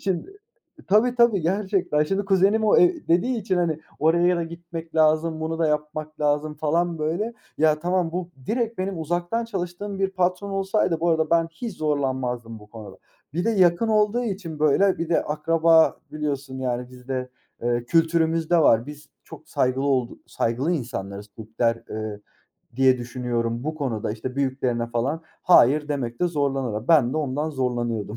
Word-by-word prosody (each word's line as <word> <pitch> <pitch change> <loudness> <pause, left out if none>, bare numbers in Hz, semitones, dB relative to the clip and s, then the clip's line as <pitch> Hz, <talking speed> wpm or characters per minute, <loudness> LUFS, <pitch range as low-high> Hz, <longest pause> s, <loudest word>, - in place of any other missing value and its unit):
şimdi 195 - -3 0.5
tabii 220 +5 +4
tabii 235 -5 +4
gerçekten, 185 -3 0
şimdi 195 +6 -1
kuzenim 195 +3 +3
o 210 - +4
eee, 350 -3 +3
dediği 230 +9 +2
için 190 -3 -1
hani 165 -3 0 0.2
oraya 170 +3 +3
da 170 - -1
gitmek 170 0 -9
lazım, 155 0 +2
bunu 160 +1 -3
da 165 - +2
yapmak 150 0 -3
lazım 150 +1 0
falan 165 +3 0
böyle. 175 +10 -2 0.2
Ya, 155 -1 +3
tamam 175 0 0
bu 180 0 -4 0.2
direkt 230 0 -1
benim 185 -2 -3
uzaktan 175 +8 -1
çalıştığım 195 -1 -5
bir 195 0 0
patron 185 +1 -1
olsaydı 195 -3 0
bu 170 +1 +2
arada 160 -1 +1
ben 165 0 +3
hiç 220 +4 -6
zorlanmazdım 130 -6 -2
bu 105 - -15
konuda. 105 -4 -10 0.4
Bir 175 +4 -1
de 230 - +2
yakın 185 +1 +3
olduğu 215 +2 +2
için, 190 -8 -5
böyle 155 +6 +3
bir 165 - -3
de 170 - +2
akraba 165 +1 +3
biliyorsun 140 -3 -4
yani 125 -1 -2
bizde, 125 0 -5 0.3
eee, 120 0 0
kültürümüzde 165 +2 +2
var, 115 -6 +4
biz 150 0 -10 0.2
çok - - -13
saygılı 130 +1 0
oldu 130 -4 0
saygılı 125 +9 -1
insanlarız, 100 - -4
Türkler, 115 +1 -1
eee, 110 -1 -5 0.6
diye 130 -1 +4
düşünüyorum, 120 -1 -3
bu 155 +1 -2
konuda 120 -9 -3
işte 125 +4 -6
büyüklerine 130 -3 -1
falan, 125 +7 -2 0.2
hayır 150 -3 +5
demekte 135 +2 -1
zorlanırlar. 135 -8 -2
Ben 145 -7 +5
de - - -2
ondan 150 +1 -1
zorlanıyordum. 120 -6 -2
155 Hz, 160 wpm, -24 LUFS, 130-180 Hz, 0.6 s, hayır